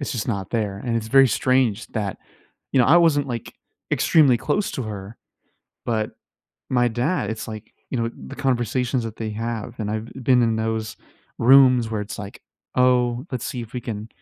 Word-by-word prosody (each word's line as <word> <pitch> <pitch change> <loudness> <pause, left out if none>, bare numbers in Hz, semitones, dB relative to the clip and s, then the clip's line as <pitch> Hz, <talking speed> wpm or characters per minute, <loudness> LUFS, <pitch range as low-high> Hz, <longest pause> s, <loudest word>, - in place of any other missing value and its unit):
it's 140 - -3
just 120 -1 -3
not 100 -4 -3
there. 105 -4 -2
And 115 -1 0
it's 110 -1 -3
very 135 +1 +6
strange 125 -1 +1
that 105 -5 -3 0.6
you 130 - +4
know, - - +4
I 160 +5 +6
wasn't, 145 -5 +3
like, 115 -2 -5 0.4
extremely 140 -7 +4
close 145 - -1
to 130 - -3
her, 105 0 -7 0.7
but, 110 -2 -1 0.6
my 120 -1 +3
dad 120 - -1
it's 110 0 -5
like, 110 0 -8 0.2
you 130 - -2
know, 115 - 0 0.2
the - - -9
conversations 125 -1 0
that 115 -1 -6
they 110 -1 -4
have, 115 0 -4
and 105 -1 -2
I've 110 +1 -3 0.2
been 125 0 +4
in 115 -1 +1
those 110 0 -2 0.4
rooms 125 -2 +6
where 110 - -2
it's 105 - -6
like, 100 -1 -9 0.4
"Oh, 125 0 +2
let's 125 -2 -3
see 125 - -4
if 115 - -11
we 125 - -4
can, 110 -2 -6
115 Hz, 190 wpm, -23 LUFS, 110-130 Hz, 0.7 s, very